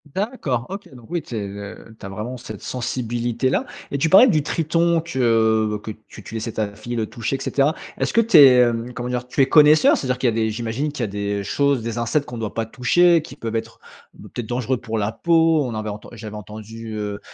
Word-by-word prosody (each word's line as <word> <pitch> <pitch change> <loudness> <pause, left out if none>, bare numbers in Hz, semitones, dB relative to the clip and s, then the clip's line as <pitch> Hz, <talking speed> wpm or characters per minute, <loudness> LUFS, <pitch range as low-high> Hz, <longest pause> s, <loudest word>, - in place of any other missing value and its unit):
D'accord, 185 - -2
OK, 195 -5 -8
donc 120 -3 -14
oui, 170 -1 -2
tu 120 - -8
es, 105 -2 -3
heu, 100 +2 -9
tu - - -10
as - - -6
vraiment 110 +6 -5
cette 110 -4 -9
sensibilité-là 120 0 -2 0.2
et 140 - -2
tu 160 +4 +1
parlais 195 +8 +8
du 155 - +2
triton 165 +2 +1
que 110 -7 +1
que - - -8 0.2
tu - - -12
tu 105 - -10
laissais 115 +1 -3
ta 105 -2 -3
fille 120 +3 -6
le 110 -2 -1
toucher 120 +4 -3
et - - -12
cetera. 145 +2 +1 0.3
Est-ce - - -1
que 230 - +5
tu 230 -4 +4
es, 135 -4 +9
hem, 120 0 +1
comment 125 0 -5
dire? 125 0 -3
Tu 130 - 0
es 135 - +4
connaisseur? 150 0 +6
C'est-à-dire 130 -2 -2
qu'il 130 - +1
y - - +3
a - - -5
des 110 -1 +1
j'imagine 120 +6 -3
qu'il 145 - -6
y - - +1
a - - -3
des 100 0 -3
choses, 140 +3 +1
des 115 0 -4
insectes, 130 +5 0
qu'on 120 - -7
doit 110 -3 -4
pas 115 -1 -2
toucher, 165 +8 +3
qui 135 - -11
peuvent 115 -5 -5
être 115 0 -4 0.3
b - - -13
peut-être, 120 - -6
dangereux 125 +2 -1
pour 115 -2 -4
la 105 +1 -1
peau? 165 +2 +3
On 120 - -4
avait 110 0 -4
enten 105 0 -8
j'avais 110 -2 -8
entendu, 110 +2 -8
heu, 105 -1 -4
120 Hz, 240 wpm, -21 LUFS, 110-140 Hz, 0.3 s, es